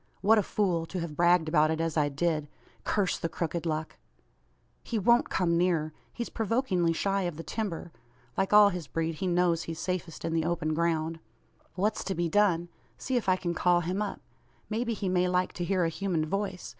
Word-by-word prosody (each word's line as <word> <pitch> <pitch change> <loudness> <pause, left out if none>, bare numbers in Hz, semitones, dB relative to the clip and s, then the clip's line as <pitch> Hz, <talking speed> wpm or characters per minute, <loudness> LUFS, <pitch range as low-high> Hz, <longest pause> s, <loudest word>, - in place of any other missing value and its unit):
What 220 +2 +5
a - - +4
fool; 180 -5 0
to 185 - -4
have 165 -3 -5
bragged 175 0 +4
about 155 -1 +3
it 160 0 -1
as 165 -1 -1
I 150 -2 +2
did! 155 +1 -1 0.4
Curse 200 -4 0
the 165 - -2
crooked 170 +1 -3
luck! 155 0 -3 0.9
"He 230 - -2
won't 235 +4 +3
come 170 -2 +1
nearer. 165 -4 +1 0.2
He's 235 - -4
provokingly 215 -6 0
shy 195 +4 0
of 155 - -10
the 165 - -6
timber. 180 -6 -4 0.4
Like 195 - 0
all 210 -1 +8
his 180 -6 -5
breed, 165 +3 -2
he 190 - 0
knows 175 -1 +2
he's 165 -1 -6
safest 180 -1 -4
in 165 - -1
the 165 -1 +1
open 165 -2 -1
ground. 165 0 0 0.6
"What's 205 +4 0
to 190 - -2
be 170 0 0
done? 175 -3 +2 0.3
See 260 - -3
if 235 -5 +1
I 185 - +5
can 175 -2 -3
call 175 +1 +3
him 180 +4 -2
up. 205 -2 -3 0.5
May 225 +3 0
be 230 -2 -2
he 200 -1 -3
may 180 0 +2
like 180 0 0
to 175 - -4
hear 185 -1 +1
a - - +1
human 170 -2 -1
voice. 195 +2 -3
175 Hz, 205 wpm, -29 LUFS, 165-195 Hz, 0.9 s, all